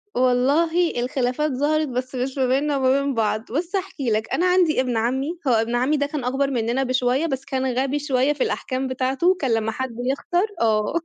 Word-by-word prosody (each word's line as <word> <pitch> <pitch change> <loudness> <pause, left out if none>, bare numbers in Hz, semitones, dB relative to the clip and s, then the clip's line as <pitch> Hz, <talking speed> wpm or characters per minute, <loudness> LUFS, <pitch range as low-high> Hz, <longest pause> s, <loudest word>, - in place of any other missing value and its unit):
والله 285 +7 +2
الخلافات 255 +3 -1
ظهرت، 300 +3 +1
بس 255 +1 -4
مش 260 +2 -3
ما 260 - +2
بيننا 280 +3 +1
وما 260 -1 +2
بين 280 0 -1
بعض. 220 -1 -1
بُص 340 +8 -2
هاحكي 345 -10 -3
لك، 215 +1 -1
أنا 355 - +1
عندي 360 -6 +3
ابن 250 -3 -1
عمّي، 265 +9 -1
هو 255 - +4
ابن 225 +2 +1
عمّي 260 +5 +2
ده 285 - +1
كان 290 -2 -4
أكبر 270 +2 0
منّنا 240 +2 0
بشوية 255 +3 +1
بس 270 -4 -3
كان 265 -2 -2
غبي 275 +2 0
شوية 275 0 +1
في 285 - -1
الأحكام 260 +1 -2
بتاعته، 265 +8 +1
كان 265 -4 -1
لمّا 225 0 0
حد 260 0 -4
يخسر 280 - 0
آه. 215 +1 +1
265 Hz, 200 wpm, -22 LUFS, 250-295 Hz, -, هو